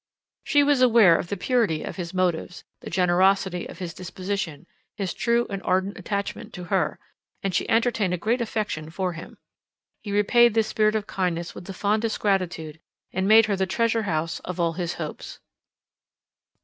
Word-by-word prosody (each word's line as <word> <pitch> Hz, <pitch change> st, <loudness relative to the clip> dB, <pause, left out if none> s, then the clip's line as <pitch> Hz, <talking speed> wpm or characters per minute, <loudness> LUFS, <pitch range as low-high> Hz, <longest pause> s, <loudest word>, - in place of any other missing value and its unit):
She 290 Hz, -1 st, +4 dB
was 285 Hz, -2 st, +3 dB
aware 230 Hz, -8 st, +6 dB
of 170 Hz, -, -2 dB
the 200 Hz, -, -3 dB
purity 210 Hz, -6 st, +1 dB
of -, -, -6 dB
his 170 Hz, -2 st, -4 dB
motives, 180 Hz, -1 st, -1 dB, 0.2 s
the -, -, -8 dB
generosity 185 Hz, +1 st, +2 dB
of -, -, -10 dB
his 180 Hz, -3 st, -5 dB
disposition, 185 Hz, -3 st, -5 dB, 0.3 s
his 195 Hz, -4 st, -2 dB
true 235 Hz, 0 st, +1 dB
and 195 Hz, -1 st, -5 dB
ardent 190 Hz, +2 st, 0 dB
attachment 200 Hz, -1 st, -4 dB
to 180 Hz, -, -7 dB
her; 180 Hz, -6 st, +1 dB, 0.5 s
and 195 Hz, -1 st, -1 dB
she -, -, 0 dB
entertained 225 Hz, -4 st, +2 dB
a 180 Hz, -, 0 dB
great 230 Hz, +8 st, 0 dB
affection 210 Hz, -9 st, -3 dB
for 180 Hz, +2 st, -2 dB
him. 165 Hz, -, -10 dB, 0.6 s
He 205 Hz, -, -6 dB
repaid 230 Hz, +3 st, +4 dB
this 225 Hz, -1 st, +3 dB
spirit 215 Hz, 0 st, +2 dB
of 215 Hz, -1 st, -1 dB
kindness 175 Hz, -4 st, -2 dB
with -, -, -10 dB
the -, -, -6 dB
fondest 215 Hz, +4 st, 0 dB
gratitude, 175 Hz, -6 st, -1 dB, 0.3 s
and 190 Hz, +1 st, 0 dB
made 220 Hz, +1 st, +7 dB
her 205 Hz, -2 st, 0 dB
the 190 Hz, 0 st, -1 dB
treasure 230 Hz, +3 st, +1 dB
house 160 Hz, 0 st, -1 dB
of 180 Hz, 0 st, -7 dB
all 170 Hz, -1 st, +1 dB
his 175 Hz, -1 st, -3 dB
hopes. 155 Hz, -3 st, -7 dB
190 Hz, 175 wpm, -25 LUFS, 175-215 Hz, 0.6 s, made